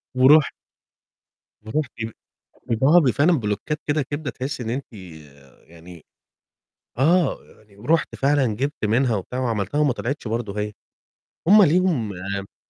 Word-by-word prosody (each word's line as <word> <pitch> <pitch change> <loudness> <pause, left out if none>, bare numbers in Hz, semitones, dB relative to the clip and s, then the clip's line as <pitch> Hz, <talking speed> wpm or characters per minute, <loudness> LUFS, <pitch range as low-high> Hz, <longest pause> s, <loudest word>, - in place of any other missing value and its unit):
ورُحت 140 +4 +5 1.1
ورُحت 135 +4 -2
ب 115 - -7 0.6
بيبوعوها 135 +9 +4
ب 135 -6 +2
فعلًا 155 +9 +3
بلوكّات 105 +9 -3
كده 150 +1 +1
كبدة 145 +2 -5
تحسّي 130 -1 -5
إن 115 - -5
أنتِ 130 -1 -5 0.7
يعني 85 0 -14 0.9
آه، 170 +6 +3 0.2
يعني 105 -2 -23
ورُحت 155 +10 0
فعلًا 140 -1 +2
جبت 140 0 -3
منها 115 +1 +2
وبتاع 125 +7 -5
وعملتها 115 +1 -2
وما 145 -4 +3
طلعتش 140 -1 -4
برضه 105 -3 -3
هي، 105 0 -3 0.8
هم 210 +1 +8
ليهم 165 - +2
المشكلة 100 +2 -6
130 Hz, 130 wpm, -22 LUFS, 105-150 Hz, 1.1 s, هم